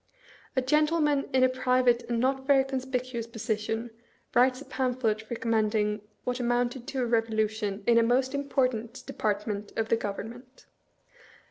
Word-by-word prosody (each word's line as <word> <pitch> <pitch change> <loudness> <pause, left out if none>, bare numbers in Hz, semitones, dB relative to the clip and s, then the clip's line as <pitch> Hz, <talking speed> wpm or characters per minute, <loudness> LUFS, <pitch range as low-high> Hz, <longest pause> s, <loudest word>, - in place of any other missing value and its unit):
A 260 - +2
gen 300 +4 +3
tleman 300 -3 +1
in 260 0 +3
a - - +7
private 255 -1 +2
and 235 -1 0
not 265 +2 0
very 275 -2 +5
conspicuous 255 -3 -3
position 225 0 -3 0.4
writes 255 +1 +4
a 290 - -10
pamphlet 240 -5 -1
recommending 215 -2 0 0.2
what 250 0 -2
amounted 245 +1 0
to 265 -2 -1
a - - +1
revolution 220 -3 0
in 235 +1 +5
a - - +5
most 255 +3 +2
important 255 -5 -1
department 210 -1 -2
of 225 0 0
the - - +4
Government. 240 +5 -7
240 Hz, 145 wpm, -28 LUFS, 225-260 Hz, 0.4 s, a